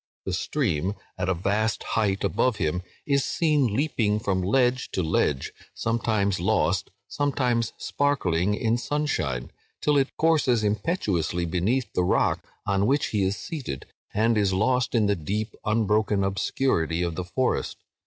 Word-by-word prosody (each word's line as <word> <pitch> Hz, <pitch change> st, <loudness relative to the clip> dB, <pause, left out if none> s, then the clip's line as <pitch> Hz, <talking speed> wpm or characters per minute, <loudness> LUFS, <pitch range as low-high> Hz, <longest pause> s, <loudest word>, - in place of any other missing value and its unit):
The 95 Hz, -, -2 dB
stream, 95 Hz, -, -1 dB, 0.2 s
at 90 Hz, 0 st, -2 dB
a 95 Hz, -, +2 dB
vast 105 Hz, +5 st, 0 dB
height 100 Hz, -3 st, 0 dB
above 125 Hz, -3 st, +1 dB
him, 90 Hz, -1 st, -1 dB, 0.2 s
is 140 Hz, -1 st, +2 dB
seen 145 Hz, -11 st, +1 dB
leaping 110 Hz, -7 st, +1 dB
from 95 Hz, -3 st, 0 dB
ledge 125 Hz, +6 st, +2 dB
to 95 Hz, -, 0 dB
ledge—sometimes 100 Hz, -, -1 dB
lost, -, -, +1 dB, 0.2 s
sometimes 125 Hz, -5 st, 0 dB
sparkling 105 Hz, -, +1 dB
in 115 Hz, +2 st, 0 dB
sunshine, 120 Hz, -, -2 dB, 0.3 s
till 150 Hz, -1 st, +2 dB
it 135 Hz, -, -1 dB
courses 150 Hz, -8 st, +3 dB
impetuously 100 Hz, -, 0 dB
beneath 100 Hz, +9 st, 0 dB
the 90 Hz, -, +1 dB
rock 90 Hz, -, +1 dB, 0.2 s
on 100 Hz, +1 st, +1 dB
which 140 Hz, +3 st, +2 dB
he 105 Hz, -, 0 dB
is 95 Hz, +1 st, 0 dB
seated, 135 Hz, -, -5 dB, 0.3 s
and 110 Hz, +1 st, +2 dB
is 100 Hz, -2 st, +2 dB
lost 125 Hz, +6 st, +1 dB
in 110 Hz, -2 st, +4 dB
the 100 Hz, 0 st, +2 dB
deep 105 Hz, +6 st, -3 dB
unbroken 105 Hz, -2 st, +2 dB
obscurity 95 Hz, -3 st, 0 dB
of 85 Hz, -1 st, -1 dB
the 90 Hz, -, -3 dB
forest. 125 Hz, +8 st, -1 dB
105 Hz, 145 wpm, -26 LUFS, 95-130 Hz, 0.3 s, in